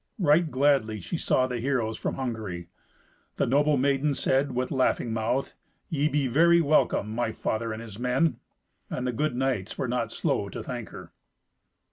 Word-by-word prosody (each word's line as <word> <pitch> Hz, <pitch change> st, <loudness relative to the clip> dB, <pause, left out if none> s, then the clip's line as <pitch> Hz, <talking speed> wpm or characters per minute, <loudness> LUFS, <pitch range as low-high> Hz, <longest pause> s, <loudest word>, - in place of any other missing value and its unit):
Right 165 Hz, -3 st, +3 dB
gladly 130 Hz, -6 st, +2 dB
she 160 Hz, -, -4 dB
saw 130 Hz, -, +2 dB
the 125 Hz, -2 st, -3 dB
heroes 120 Hz, -3 st, 0 dB
from -, -, -3 dB
Hungary. 110 Hz, -9 st, -4 dB, 0.7 s
The -, -, +1 dB
noble 145 Hz, +3 st, +3 dB
maiden 140 Hz, +2 st, +1 dB
said, 135 Hz, +1 st, +1 dB
with 125 Hz, +1 st, -2 dB
laughing 130 Hz, -3 st, +1 dB
mouth, 115 Hz, +4 st, -1 dB, 0.4 s
"Ye 150 Hz, -1 st, +1 dB
be 145 Hz, -2 st, +1 dB
very 170 Hz, +7 st, +5 dB
welcome, 145 Hz, -8 st, +2 dB
my 120 Hz, 0 st, -1 dB
father 110 Hz, +1 st, -2 dB
and 110 Hz, +1 st, -5 dB
his 110 Hz, -2 st, -10 dB
men." 125 Hz, +6 st, +1 dB, 0.5 s
And 125 Hz, -, -3 dB
the 125 Hz, -, -1 dB
good 150 Hz, +2 st, -1 dB
knights 125 Hz, -6 st, -1 dB
were -, -, -1 dB
not 120 Hz, -1 st, -1 dB
slow -, -, -1 dB
to -, -, -6 dB
thank -, -, -6 dB
her. -, -, -11 dB
130 Hz, 170 wpm, -27 LUFS, 115-145 Hz, 0.7 s, very